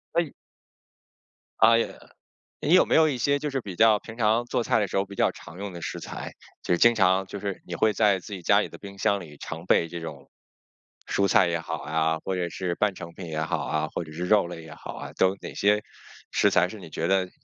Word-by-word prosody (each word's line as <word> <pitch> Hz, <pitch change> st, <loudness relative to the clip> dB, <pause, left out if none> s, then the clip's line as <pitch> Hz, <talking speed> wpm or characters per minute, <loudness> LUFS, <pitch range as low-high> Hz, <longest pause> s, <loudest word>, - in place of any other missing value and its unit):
诶。 170 Hz, -4 st, +1 dB, 1.3 s
啊， 115 Hz, +1 st, +7 dB
也 115 Hz, -, -1 dB, 0.7 s
你 155 Hz, -, 0 dB
有 185 Hz, -, +7 dB
没 -, -, +1 dB
有 160 Hz, 0 st, +6 dB
一 130 Hz, -4 st, -2 dB
些， 140 Hz, +3 st, +2 dB
就 150 Hz, 0 st, -3 dB
是 135 Hz, -1 st, -1 dB
比 95 Hz, -6 st, -8 dB
较 110 Hz, -2 st, +6 dB
平 110 Hz, +1 st, -11 dB
常 115 Hz, +1 st, +2 dB
做 120 Hz, -, 0 dB
菜 110 Hz, -, +2 dB
的 100 Hz, -, 0 dB
时 -, -, -4 dB
候 95 Hz, -, +2 dB
比 100 Hz, 0 st, -11 dB
较 -, -, +2 dB
常 80 Hz, +4 st, -12 dB
用 100 Hz, -1 st, -5 dB
的 85 Hz, -, -8 dB
食 -, -, -4 dB
材， -, -, -7 dB, 0.3 s
就 -, -, -1 dB
是 85 Hz, -, +3 dB
经 120 Hz, 0 st, +6 dB
常， 95 Hz, -2 st, +3 dB
就 100 Hz, -, -7 dB
是 100 Hz, -1 st, -5 dB
你 85 Hz, -, -5 dB
会 110 Hz, +3 st, +2 dB
在 105 Hz, -3 st, +3 dB
自 100 Hz, -, -11 dB
己 95 Hz, -, -5 dB
家 -, -, +4 dB
里 -, -, -4 dB
的 -, -, -11 dB
冰 100 Hz, 0 st, -10 dB
箱 100 Hz, -1 st, +1 dB
里 75 Hz, -4 st, -11 dB
常 80 Hz, +4 st, -7 dB
备 85 Hz, -, +4 dB
这 85 Hz, +1 st, -7 dB
种， 80 Hz, -, -9 dB, 0.8 s
蔬 100 Hz, 0 st, +1 dB
菜 90 Hz, -1 st, +5 dB
也 85 Hz, -1 st, -1 dB
好 -, -, -5 dB
啊， 80 Hz, +1 st, 0 dB
或 95 Hz, -, -1 dB
者 90 Hz, -1 st, -1 dB
是 85 Hz, +1 st, -3 dB
半 105 Hz, -3 st, +1 dB
成 85 Hz, -1 st, -9 dB
品 90 Hz, -1 st, -8 dB
也 80 Hz, -1 st, -3 dB
好 -, -, -1 dB
啊， 80 Hz, 0 st, -1 dB
或 85 Hz, -, -3 dB
者 80 Hz, -, -12 dB
是 90 Hz, +3 st, -4 dB
肉 100 Hz, -1 st, +4 dB
类 85 Hz, -2 st, -8 dB
也 80 Hz, -, -11 dB
好 -, -, -8 dB
啊， -, -, -8 dB
都 95 Hz, +1 st, +3 dB
哪 -, -, -7 dB
些 105 Hz, +1 st, +2 dB, 0.5 s
食 105 Hz, -, +3 dB
材 90 Hz, -2 st, +4 dB
是 110 Hz, -, -9 dB
你 90 Hz, -, -10 dB
觉 80 Hz, +2 st, -3 dB
得， 95 Hz, -1 st, +2 dB
95 Hz, 270 characters per minute, -26 LUFS, 85-110 Hz, 1.3 s, 啊